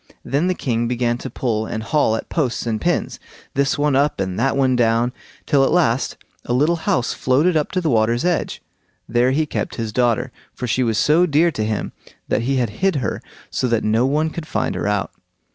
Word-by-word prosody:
Then 145 +6 0
the 185 - +1
king 120 -5 -1
began 120 0 0
to 130 - -6
pull 110 -3 -2
and 110 - -4
haul 110 -2 +2
at - - -5
posts 130 -8 -1
and 110 -2 -2
pins, - - -1 0.3
this 140 0 +1
one 145 -1 +2
up 145 -2 +2
and 95 -1 -2
that 135 0 +1
one 130 -2 +3
down, 120 +1 +2 0.3
till 140 -2 +3
at - - +3
last 145 -8 +1 0.3
a 120 - -2
little 150 +7 +2
house 125 -1 +1
floated 150 +8 +2
up 150 -2 0
to 185 - +1
the 165 - -1
water's 115 +5 +2
edge. 180 -2 -1 0.4
There 120 +2 +2
he 150 +4 +1
kept - - -3
his 115 -2 -4
daughter, 120 +1 +1 0.2
for 125 - -4
she 125 +2 0
was 115 -4 +1
so 165 +4 +4
dear 165 +2 +3
to 110 - -2
him 110 0 -2 0.4
that - - +1
he 135 +4 0
had 120 -5 0
hid 190 -3 +3
her, 125 -9 -2 0.3
so 130 - 0
that 115 -2 +1
no 110 +4 +2
one 155 +3 +1
could 160 -1 -6
find - - -1
her - - -2
out. 105 -1 -1
125 Hz, 215 wpm, -20 LUFS, 115-150 Hz, 0.4 s, so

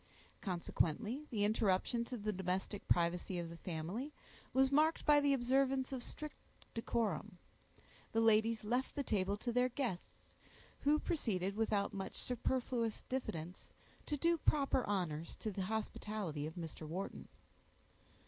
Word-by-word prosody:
Consequently, 210 - -1
the 210 -4 0
interruption 215 +2 +2
to 250 +1 -5
the 210 0 -1
domestic 190 +2 -2
privacy 175 +1 +2
of 170 -1 -3
the 170 - -8
family 180 - -4 0.4
was 265 +1 +4
marked 310 +3 +4
by 295 -1 +7
the 285 -1 +3
observance 265 +1 +2
of 260 - -3
strict 305 +4 -6 0.4
decorum. 220 -4 -1 0.7
The 225 - +2
ladies 225 0 +4
left 245 +5 0
the 280 - 0
table 200 -4 +1
to 240 +3 -2
their 250 +1 +3
guests, 240 -8 -4 0.5
who 295 +2 +4
proceeded, 200 - 0
without 215 -2 +1
much 195 -1 -4
superfluous 245 -2 -1
diffidence, 180 -9 -4 0.4
to 295 - 0
do 335 +3 +3
proper 275 -4 +3
honors 170 -6 -1
to 215 - -3
the 195 - -3
hospitality 210 -7 -2
of 160 - -8
Mr. 160 -2 -6
Wharton. 185 +5 -4
220 Hz, 140 wpm, -37 LUFS, 185-260 Hz, 0.7 s, by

